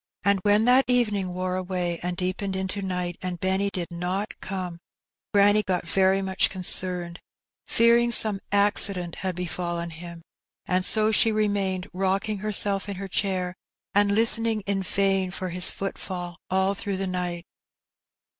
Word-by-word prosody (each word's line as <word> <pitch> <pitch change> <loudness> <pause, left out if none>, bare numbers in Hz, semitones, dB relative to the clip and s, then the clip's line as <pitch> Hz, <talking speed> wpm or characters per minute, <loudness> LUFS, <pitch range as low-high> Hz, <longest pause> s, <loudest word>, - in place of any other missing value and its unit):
211 200 +1 +3
when 210 +2 +4
thAt 255 +2 +6
evening 210 -7 +1
wore 185 0 -2
away 180 -2 -2
and 180 0 -3
deepened 190 +1 -2
into 190 +1 -2
night, 180 -2 -2
and 180 -1 -4
Benny 190 +2 +1
did 180 -2 -4
not 180 +4 -2
come, 185 -3 -5 0.5
granny 205 +1 +5
got 180 -4 -2
very 190 +2 +3
much 190 0 +1
concerned, 180 -2 -3 0.5
fear 235 +1 +5
ing 240 0 +1
some 215 -4 +4
accident 200 -3 +2
had 185 -2 -3
befallen 175 -1 -3
him; 170 +1 -9 0.4
and 185 0 +1
so 215 +2 +3
she 220 +1 +4
remained. 200 -3 0
rocking 195 +3 -1
herself 205 -1 +1
in 200 - -4
her 195 +1 -6
chair, 185 -1 -1 0.4
and 200 0 +3
listening 225 0 +3
in 195 0 -1
vain 195 0 +1
for 185 0 -4
his 180 +1 0
^ - - +2
footfall 180 -3 -5
all 190 +1 +2
through 200 -1 -3
the 195 - -1
night. 180 -2 -3
190 Hz, 155 wpm, -25 LUFS, 180-200 Hz, 0.5 s, thAt